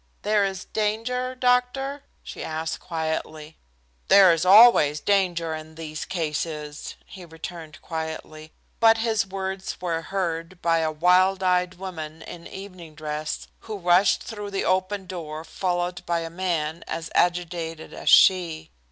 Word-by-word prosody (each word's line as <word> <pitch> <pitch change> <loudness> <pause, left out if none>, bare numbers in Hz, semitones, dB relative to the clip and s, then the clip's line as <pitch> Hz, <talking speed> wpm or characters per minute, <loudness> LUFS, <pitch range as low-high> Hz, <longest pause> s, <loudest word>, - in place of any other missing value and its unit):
"There 210 -1 +2
is 190 -1 -3
danger, 230 +4 -2
doctor?" 255 +3 +1 0.2
she - - -8
asked 160 0 -3
quietly 160 -2 -4 0.5
"There 190 -3 +7
is 165 +2 -1
always 190 -7 +7
danger 175 -4 +1
in 155 0 -8
these 155 -2 -6
cases," 150 -3 -4
he 190 - -11
returned 165 -1 -9
quietly, 160 -1 -6 0.3
but 225 0 +6
his 225 -3 0
words 190 0 -5
were 165 -2 -2
heard 170 -1 -3
by 165 -1 +2
a 160 -1 0
wild 180 +4 +3
eyed 180 0 +1
woman 160 -4 -7
in 170 -1 -10
evening 185 -5 -10
dress 150 0 -4
who 215 -2 -7
rushed 180 +1 +3
through 210 -3 -6
the 195 -1 -2
open 190 +1 0
door 160 -4 -6
followed 175 +1 -2
by 170 -1 0
a 165 0 -6
man 170 -3 -2
as 165 0 -5
agitated 170 -2 -1
as - - -2
she. 165 -4 +4
175 Hz, 140 wpm, -24 LUFS, 160-195 Hz, 0.5 s, There